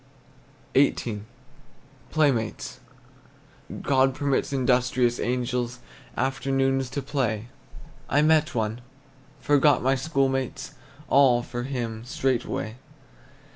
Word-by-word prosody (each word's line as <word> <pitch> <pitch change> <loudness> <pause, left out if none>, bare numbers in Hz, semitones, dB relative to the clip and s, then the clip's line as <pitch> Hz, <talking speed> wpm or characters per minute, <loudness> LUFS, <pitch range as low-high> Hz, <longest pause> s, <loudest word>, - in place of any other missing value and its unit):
XVIII. 120 -6 +2 0.9
PLAYMATES. 135 -8 0 1.0
God 135 -1 +3
permits 140 -1 0
industrious 125 -2 +2
angels 125 0 -1 0.4
Afternoons 135 0 0
to 140 0 -4
play. 120 -5 -2 0.6
I 145 - +3
met 155 +1 +3
one, 110 +1 -1 0.6
forgot 145 -1 +3
my 135 +1 +3
school 135 0 +1
mates, 135 -1 -3 0.3
All, 130 -3 +5
for 120 0 -5
him, 115 -4 -4
straightway. 125 -3 -2
130 Hz, 90 wpm, -25 LUFS, 120-135 Hz, 1.0 s, All